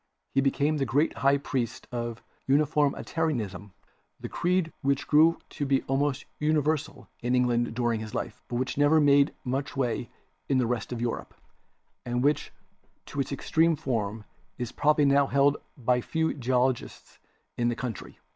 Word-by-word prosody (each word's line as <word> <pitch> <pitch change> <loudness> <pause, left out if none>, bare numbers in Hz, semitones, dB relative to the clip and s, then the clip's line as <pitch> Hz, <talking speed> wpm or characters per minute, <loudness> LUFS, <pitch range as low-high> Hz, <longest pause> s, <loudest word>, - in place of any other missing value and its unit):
He 135 - +3
became 145 +3 +1
the 135 - 0
great 145 +4 +1
high 140 +1 +3
priest 130 -5 -3
of 120 -1 -4 0.3
Uniformi 145 0 +2
tarianism 110 - -2 0.3
— - - -32
a - - -2
creed 180 -1 0
which 140 0 0
grew 160 +3 +5
to - - -4
be 135 -1 +2
almost 135 0 0
universal 155 0 0
in 125 +1 +1
England 120 -2 +1
during 120 -2 0
his 110 -1 -7
life, - - -4
but 120 - -4
which 130 +3 -2
never 145 +2 +5
made 145 -1 +5
much 135 +3 -3
way 125 -2 -1 0.4
in 135 - +3
the 125 - +2
rest 120 +1 -2
of 120 -1 -4
Europe, 120 -1 -3 0.7
and 120 0 -1
which 145 0 +1 0.6
in 145 - -3
its 135 - -1
extreme 165 +4 +2
form 110 -6 -2 0.3
is 125 -2 -4
probably 150 0 +3
now 140 0 +4
held 140 +1 +3 0.2
by 125 -1 +1
few 160 +5 -1
geologists 130 -1 -1 0.4
in 120 - 0
any 120 - 0
country.' 120 -4 -6
135 Hz, 165 wpm, -27 LUFS, 120-145 Hz, 0.7 s, grew